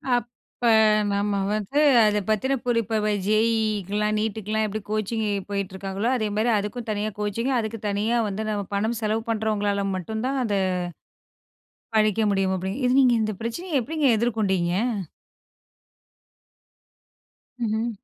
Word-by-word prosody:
அப்ப, 240 Hz, -1 st, -1 dB, 0.9 s
நம்ம 200 Hz, 0 st, 0 dB, 0.2 s
வந்து 215 Hz, +7 st, -1 dB, 0.2 s
அதை 210 Hz, -1 st, +3 dB
பத்தின 260 Hz, +6 st, +1 dB
புரி 240 Hz, -2 st, +2 dB
இப்ப 215 Hz, -1 st, 0 dB, 0.2 s
ஜேஇஇக்கலாம், 215 Hz, -1 st, +1 dB
நீட்டுக்குலாம் 220 Hz, 0 st, -1 dB
எப்படி 215 Hz, +1 st, -4 dB
கோச்சிங் 215 Hz, +1 st, -1 dB, 0.2 s
போயிட்டுருக்காங்களோ 195 Hz, +1 st, -3 dB
அதேமாதிரி 215 Hz, 0 st, 0 dB
அதுக்கும் 210 Hz, +4 st, -4 dB
தனியா 210 Hz, 0 st, -1 dB
கோச்சிங் 210 Hz, +5 st, -1 dB
அதுக்கு 225 Hz, 0 st, -4 dB
தனியா 210 Hz, +4 st, 0 dB
வந்து 205 Hz, +2 st, -3 dB
நம்ம 205 Hz, -1 st, -1 dB
பணம் 220 Hz, +3 st, 0 dB
செலவு 220 Hz, +1 st, 0 dB
பண்ணுறவங்களால 205 Hz, -2 st, 0 dB
மட்டும் 220 Hz, +5 st, -4 dB
தான் 270 Hz, 0 st, -1 dB
அத 220 Hz, -4 st, -1 dB, 1.4 s
படிக்க 215 Hz, 0 st, +3 dB
முடியும் 195 Hz, -1 st, +1 dB
அப்படிங்க 190 Hz, +6 st, -3 dB
இது 250 Hz, -, +3 dB
நீங்க 250 Hz, -2 st, +5 dB
இந்த 215 Hz, 0 st, -1 dB
பிரச்சனயை 310 Hz, +9 st, -4 dB
எப்படிங்க 300 Hz, +4 st, 0 dB
எதிர்கொண்டீங்க? 200 Hz, -7 st, 0 dB, 2.9 s
ம்ஹ்ம். 220 Hz, +1 st, 0 dB
215 Hz, 120 wpm, -24 LUFS, 205-225 Hz, 2.9 s, நீங்க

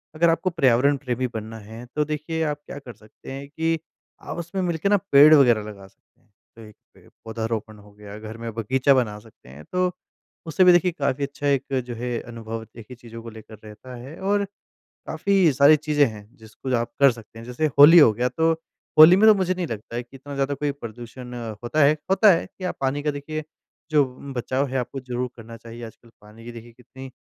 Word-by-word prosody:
अगर 170 Hz, +1 st, +3 dB
आपको 175 Hz, +3 st, +1 dB
पर्यावरण 140 Hz, -3 st, +3 dB
प्रेमी 130 Hz, -1 st, -3 dB
बनना 110 Hz, 0 st, -6 dB
है, 110 Hz, +3 st, -11 dB
तो 150 Hz, -, +2 dB
देखिए, 155 Hz, +2 st, -4 dB
आप 150 Hz, -1 st, -2 dB
क्या 140 Hz, -, -9 dB
कर 125 Hz, -4 st, -11 dB
सकते 105 Hz, +5 st, -14 dB
हैं 140 Hz, +1 st, -7 dB
कि 160 Hz, +2 st, -1 dB, 0.4 s
आप -, -, -7 dB
उसमें 180 Hz, +3 st, -4 dB
मिलके 175 Hz, +1 st, -1 dB
ना, 205 Hz, -, +4 dB
पेड़ 145 Hz, +3 st, +8 dB
वगैरह 120 Hz, -7 st, +5 dB
लगा 100 Hz, -2 st, -10 dB
सकते -, -, -33 dB
हैं। -, -, -35 dB, 0.3 s
तो 115 Hz, -, -14 dB
एक 105 Hz, -1 st, -14 dB, 0.2 s
पे -, -, -21 dB, 0.2 s
पौधारोपण 110 Hz, -1 st, -4 dB
हो 105 Hz, 0 st, -17 dB
गया, 105 Hz, 0 st, -11 dB
घर 110 Hz, +1 st, -9 dB
में 115 Hz, 0 st, -6 dB
बगीचा 130 Hz, +5 st, +2 dB
बना 110 Hz, -5 st, 0 dB
सकते 105 Hz, -, -19 dB
हैं, 70 Hz, +3 st, -12 dB
तो 180 Hz, 0 st, +1 dB, 0.5 s
उससे 165 Hz, +4 st, +2 dB
भी, 180 Hz, -, +7 dB
देखिए, 175 Hz, +1 st, +3 dB
काफ़ी 140 Hz, 0 st, -1 dB
अच्छा 140 Hz, +1 st, -4 dB
एक 140 Hz, -1 st, 0 dB
जो 120 Hz, -, -5 dB
है, 120 Hz, 0 st, -3 dB
अनुभव 115 Hz, -1 st, -7 dB
एक 110 Hz, -, -10 dB
ही 125 Hz, -, -9 dB
चीज़ों 115 Hz, -1 st, -11 dB
को 115 Hz, -, -8 dB
लेकर 110 Hz, -1 st, -13 dB
रहता 110 Hz, +4 st, -11 dB
है, 130 Hz, +6 st, -10 dB
और 200 Hz, +1 st, 0 dB, 0.6 s
काफ़ी 180 Hz, 0 st, +2 dB
सारी 140 Hz, +3 st, +6 dB
चीज़ें 150 Hz, -1 st, +2 dB
हैं, 105 Hz, -2 st, -10 dB
जिसको 110 Hz, +4 st, -7 dB
आप 120 Hz, 0 st, -3 dB
कर 140 Hz, -2 st, +6 dB
सकते 115 Hz, -1 st, -13 dB
हैं। 115 Hz, -, -10 dB
जैसे 125 Hz, +6 st, -1 dB
होली 165 Hz, +4 st, +10 dB
हो 130 Hz, -7 st, +7 dB
गया, 125 Hz, +3 st, -1 dB
तो 165 Hz, 0 st, +1 dB, 0.5 s
होली 165 Hz, +4 st, +10 dB
में 220 Hz, +2 st, +5 dB
तो 215 Hz, -, +7 dB
मुझे 185 Hz, -1 st, 0 dB
नहीं 180 Hz, -2 st, -4 dB
लगता 115 Hz, +1 st, -7 dB
है 120 Hz, -, -3 dB
कि 130 Hz, +3 st, -18 dB
इतना 140 Hz, +2 st, -10 dB
ज़्यादा 140 Hz, +1 st, -1 dB
कोई 145 Hz, +1 st, -2 dB
प्रदूषण 120 Hz, -1 st, -10 dB, 0.3 s
होता 140 Hz, +5 st, +1 dB
है, 150 Hz, +2 st, +4 dB
होता 195 Hz, +1 st, +6 dB
है 165 Hz, -, -1 dB
कि 185 Hz, -, -15 dB
आप -, -, -3 dB
पानी 140 Hz, +2 st, -1 dB
का 150 Hz, -, 0 dB
देखिए, 155 Hz, +2 st, -6 dB, 0.5 s
जो 150 Hz, -2 st, +5 dB
उम, 135 Hz, +1 st, -10 dB
बचाव 130 Hz, +3 st, -1 dB
है, 130 Hz, +1 st, -3 dB
आपको 125 Hz, +2 st, -4 dB
ज़रूर 125 Hz, -1 st, -4 dB
करना 115 Hz, 0 st, -11 dB
चाहिए। 115 Hz, +1 st, -11 dB
आजकल 115 Hz, +1 st, -15 dB
पानी 110 Hz, +2 st, -16 dB
की 120 Hz, -, -7 dB
देखिए, 120 Hz, 0 st, -12 dB
कितनी 130 Hz, +2 st, -12 dB
130 Hz, 225 wpm, -23 LUFS, 115-155 Hz, 0.6 s, होली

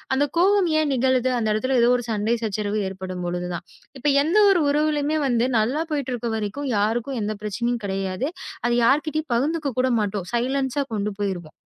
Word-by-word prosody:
அந்த 285 Hz, +2 st, +3 dB
கோபம் 380 Hz, 0 st, +4 dB
ஏன் 300 Hz, -2 st, +1 dB
நிகழுது? 255 Hz, 0 st, +2 dB
அந்த 220 Hz, -, -1 dB
இடத்துல 255 Hz, +4 st, 0 dB
ஏதோ 240 Hz, -, +5 dB
ஒரு 245 Hz, -, -6 dB
சண்டை, 220 Hz, +2 st, +1 dB
சச்சரவு 210 Hz, 0 st, -1 dB
ஏற்படும்பொழுது 180 Hz, -2 st, -4 dB
தான். -, -, -6 dB, 0.3 s
இப்ப 295 Hz, -, -2 dB, 0.2 s
எந்த 340 Hz, +7 st, +1 dB
ஒரு 350 Hz, -4 st, +3 dB
உறவுலயுமே 300 Hz, +1 st, +1 dB
வந்து, 240 Hz, 0 st, +2 dB
நல்லா 265 Hz, +9 st, 0 dB
போயிட்டு 275 Hz, -4 st, -2 dB
இருக்க 235 Hz, 0 st, -3 dB
வரைக்கும் 235 Hz, +7 st, -3 dB
யாருக்கும் 235 Hz, +5 st, 0 dB
எந்தப் 210 Hz, 0 st, -3 dB
பிரச்சனையும் 235 Hz, +3 st, -2 dB
கிடையாது. 195 Hz, +7 st, -2 dB, 0.4 s
அதை 240 Hz, -, +2 dB
யார்கிட்டயும் 305 Hz, +1 st, +1 dB
பகிர்ந்துக்க 295 Hz, +2 st, 0 dB
கூட 260 Hz, -, +1 dB
மாட்டோம். 200 Hz, -3 st, -3 dB
சைலன்ஸா 265 Hz, +3 st, 0 dB
கொண்டு 210 Hz, 0 st, -1 dB
போயிருவோம். 185 Hz, -6 st, -3 dB
240 Hz, 170 wpm, -23 LUFS, 210-285 Hz, 0.4 s, ஏதோ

